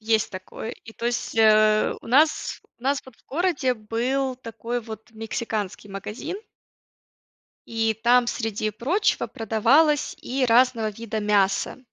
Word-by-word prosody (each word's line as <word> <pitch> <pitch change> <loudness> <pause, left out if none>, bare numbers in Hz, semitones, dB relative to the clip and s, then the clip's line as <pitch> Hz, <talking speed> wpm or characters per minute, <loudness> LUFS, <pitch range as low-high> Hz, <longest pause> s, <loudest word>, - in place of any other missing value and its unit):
есть 220 0 +1
такое, 185 +4 -7
и 225 - -12
то 235 - -4
есть, 240 -1 -2
э, 215 -1 +5
у - - -14
нас 300 +6 +2 0.2
у - - -24
нас 275 +1 +1
вот 260 -3 -15
в - - -30
городе 295 -5 0
был 250 +5 -1
такой 235 0 -5
вот 220 0 -10
мексиканский 220 -2 -4
магазин 210 - -6 1.3
и 225 -1 0
там, 245 0 +5
среди 215 -3 -2
прочего, 305 - 0
продавалось 255 +8 +2
и 260 +1 -1
разного 235 -2 +4
вида 220 0 -5
мясо. 200 +2 +1
230 Hz, 135 wpm, -24 LUFS, 215-255 Hz, 1.3 s, э